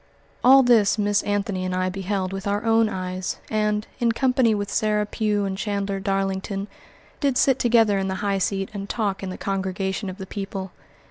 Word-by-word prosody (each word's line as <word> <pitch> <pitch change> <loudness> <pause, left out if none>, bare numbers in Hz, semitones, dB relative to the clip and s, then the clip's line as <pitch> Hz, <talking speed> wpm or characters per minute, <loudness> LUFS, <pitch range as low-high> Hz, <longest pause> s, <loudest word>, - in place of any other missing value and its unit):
All 265 +2 +8
this 225 -4 +4
Miss 205 -1 +2
Anthony 200 -2 -1
and 185 0 -2
I 185 0 0
beheld 190 0 -2
with 195 +1 -5
our 205 +1 0
own 225 -1 +4
eyes, 185 -1 -4
and, 210 0 0
in 235 -1 +2
company 250 -3 +2
with 205 -1 -3
Sarah 210 -1 +1
Pugh 210 -1 0
and 190 -1 -2
Chandler 200 -1 -2
Darlington, 195 0 -2 0.5
did 275 -4 +1
sit 270 -2 +3
together 225 -4 +4
in 195 - -1
the 190 - -2
high 200 -1 +1
seat 195 0 -1
and 200 -1 -6
talk 205 -4 -1
in 190 - -4
the 185 - -6
congregation 190 +1 -2
of 185 - -7
the 190 - -6
people. 195 -1 -5
200 Hz, 190 wpm, -23 LUFS, 195-215 Hz, 0.5 s, All